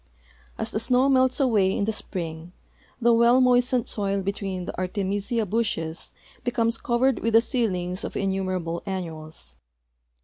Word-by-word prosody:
As - - -4
the - - -1
snow 250 +4 +2
melts 260 0 +3
away 210 -8 +2
in 200 - 0
the 220 - -1
spring, 170 -4 -5 0.5
the 235 -1 +4
well 235 +2 +5
moistened 250 -1 +3
soil 200 -2 -1
between 195 -2 -3
the - - -6
Artemisia 200 +4 -1
bushes 185 -6 -1 0.3
l)ecomes 230 -1 0
covered 245 +2 +1
with 230 0 -1
the 225 - +8
seedlings 185 -7 -1
of - - -4
innumerable 185 -3 -2
annuals. 160 - -6
200 Hz, 140 wpm, -25 LUFS, 185-235 Hz, 0.5 s, the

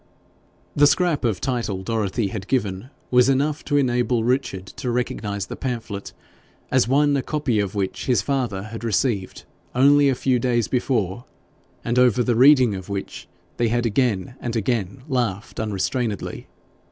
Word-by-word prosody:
The 145 0 +6
scrap 155 +1 +1
of 110 -5 0
title 120 -7 -2
Dorothy 105 0 -1
had 100 -1 -6
given 105 -3 -1 0.2
was 125 +1 +5
enough 145 +3 +1
to 145 - +1
enable 125 -3 +1
Richard 120 -6 -1
to 125 - -3
recognise 105 -5 -2
the - - -7
pamphlet 115 -6 -5 0.6
as 130 -3 +3
one 145 +2 +3
a 140 - +1
copy 140 -6 -1
of 100 0 -2
which 95 -2 -3
his 120 -7 +2
father 125 -8 -1
had 110 +2 -8
received 110 -3 -1 0.3
only 140 +2 +5
a 135 - +1
few 125 0 +1
days 120 -2 +1
before, 120 -4 -1 0.6
and 120 +1 +1
over 125 -1 +4
the 120 -1 +1
reading 130 -2 +6
of 95 0 -7
which 100 -1 -5 0.3
they 120 - +2
had 120 +1 0
again 115 -3 0
and 120 -1 -4
again 115 +1 -2
laughed 120 -7 -2
unrestrainedly. 110 +1 -2
120 Hz, 155 wpm, -22 LUFS, 105-130 Hz, 0.6 s, The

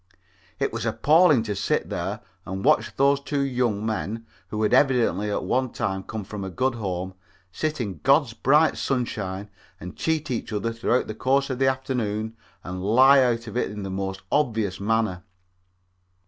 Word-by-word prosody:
It - - -1
was - - -3
appalling 155 -4 +4
to 105 -2 -3
sit - - -1
there - - -3 0.2
and 95 +4 -5
watch 155 +2 +3
those 140 +1 +3
two 140 0 -2
young 125 -6 0
men, 110 0 -3 0.2
who 110 +3 -3
had 105 - +1
evidently 120 -7 +3
at 105 - -1
one 125 +7 0
time 95 -4 -2
come 110 +2 -6
from 100 +1 -7
a 95 - -4
good 130 +9 0
home, 95 -4 -4 0.4
sit 155 +9 -2
in 100 -6 -4
God's 135 -3 +3
bright 150 +7 +3
sunshine 105 -6 -3 0.3
and 90 - -8
cheat 160 -3 -1
each 120 - -3
other 110 +2 -2
throughout 115 +2 +1
the 110 - -5
course 135 +5 +1
of 130 0 -4
an 135 - +4
afternoon 115 -5 -2 0.3
and 90 +1 -6
lie 130 +7 +6
out 120 -2 +1
of 110 - -8
it 125 - 0
in 105 -1 -6
the 95 - -5
most 95 0 -4
obvious 110 -10 0
manner. 110 -3 0
115 Hz, 175 wpm, -24 LUFS, 100-130 Hz, 0.4 s, lie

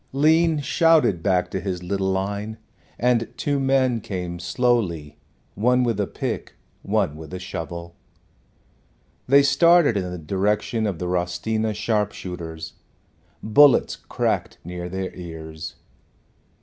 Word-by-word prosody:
Lean 160 +3 +3
shouted 160 - +3
back 90 -1 +1
to 95 - -2
his 90 -2 -4
little 95 +1 -1
line, 100 +3 -3 0.4
and 120 -1 +1
two 145 -1 0
men 130 -3 +2
came 90 -3 -5
slowly, 85 - 0 0.3
one 125 +4 +2
with 115 -4 0
a 100 - 0
pick, - - -4 0.3
one 75 - 0
with 80 +1 -10
a - - -3
shovel. 85 -2 -6 1.3
They 140 +2 +6
started 155 0 +5
in 90 -2 -2
the 90 - -5
direction 105 +6 0
of 95 -5 -3
the 90 - -4
Rostina 90 +5 -1
sharp 105 -1 0
shooters. 80 -3 -7 0.7
Bullets 140 +5 +5
cracked - - -2
near 90 +1 -6
their 95 +1 -4
ears. 80 -2 -8
100 Hz, 125 wpm, -23 LUFS, 90-125 Hz, 1.3 s, They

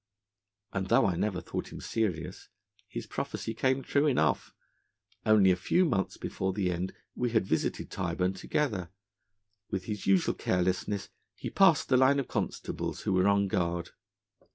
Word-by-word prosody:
And 95 -1 -1
though - - +4
I 95 -3 +1
never 95 0 -1
thought - - -5
him - - -7
serious, 90 -9 -3 0.4
his - - -6
prophecy 110 - -4
came 130 +3 +1
true 145 +3 +2
enough. 80 - +1 0.8
Only 105 -3 +6
a - - +3
few 175 - +2
months 100 - 0
before 95 0 -2
the 95 -2 0
end 90 +2 -3 0.2
we 125 - -1
had 110 -4 +2
visited 80 - -1
Tyburn 90 +1 -1
together. 95 - -1 0.8
With 95 -2 -2
his 105 +1 -5
usual 95 -1 +4
carelessness, 95 +2 -1 0.3
he - - -6
passed 190 -6 +4
the 130 - +5
line 135 +2 +5
of 135 - -2
constables - - -3
who 100 - 0
were 95 +1 +3
on 100 0 +3
guard. 85 -3 -1
100 Hz, 155 wpm, -30 LUFS, 90-120 Hz, 0.8 s, Only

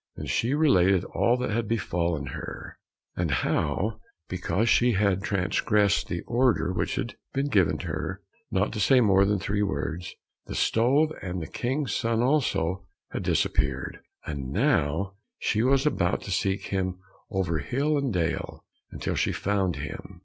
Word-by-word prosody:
Then - - -6
she 125 +5 +1
related 95 - +4
all 120 +2 +1
that 125 - -2
had 115 0 -1
befallen 85 -8 -1
her, - - -7 0.4
and 85 -2 -1
how 105 - 0 0.3
because 95 +4 0
she 120 +1 +4
had 100 -2 +2
transgressed 100 +1 +1
the - - -3
order 120 -6 +1
which - - -1
had - - -4 0.2
been 140 +1 0
given 100 -9 +3
her - - -4 0.3
not 100 +3 0
to 105 - -4
say 130 +6 +5
more 100 -4 +5
than 105 +1 +2
three 100 +2 -1
words, 85 -2 -3 0.3
the - - -5
stove, 140 +7 +3
and 90 -1 -4
the 80 - -4
King's 130 - -2
son 115 0 +1
also, 100 - +1 0.2
had - - -3
disappeared, - - 0 0.3
and 70 -4 -4
now 80 +8 +1 0.2
she 105 - 0
was 135 +3 +3
about 95 -11 +1
to 100 - -6
seek 95 +2 -1
him 95 -1 -1 0.3
over 90 -6 0
hill 140 - 0
and 140 -3 0
dale 85 -4 -2 0.3
until - - -3
she - - +1
found 95 -3 0
him. 70 +1 -7
100 Hz, 155 wpm, -27 LUFS, 90-120 Hz, 0.4 s, say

